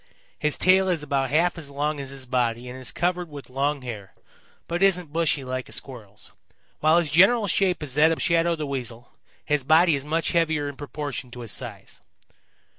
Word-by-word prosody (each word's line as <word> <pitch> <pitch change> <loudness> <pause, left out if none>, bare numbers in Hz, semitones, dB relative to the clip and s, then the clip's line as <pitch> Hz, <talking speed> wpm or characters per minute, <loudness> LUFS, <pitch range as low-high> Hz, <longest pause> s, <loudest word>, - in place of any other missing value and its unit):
His 150 -1 0
tail 190 +1 +4
is 165 -4 0
about 135 -2 0
half 170 +5 +2
as 150 -3 -6
long 145 +1 -2
as 135 -1 -5
his 135 -1 -7
body 120 -1 -1
and 125 +1 -8
is 130 - -3
covered 175 0 -1
with 145 -3 -10
long 140 +1 -1
hair, 105 -6 -8 0.5
but 170 +2 -2
isn't 180 -6 +2
bushy 160 -4 +1
like 130 0 -4
a - - -14
Squirrel's. 110 -7 -6 0.5
While 155 +2 +4
his 165 -4 +1
general 200 +8 +5
shape 185 -3 +1
is 140 -4 -3
that 155 +3 +5
of 165 - -1
Shadow 170 0 +2
the 155 -2 -4
Weasel, 125 -4 -5 0.3
his 150 -2 0
body 160 +3 +5
is 135 - -4
much 160 +3 -1
heavier 160 -3 +1
in 145 - -6
proportion 145 -2 -6
to 120 0 -9
his 115 -3 -7
size. - - -7
150 Hz, 195 wpm, -25 LUFS, 130-170 Hz, 0.5 s, general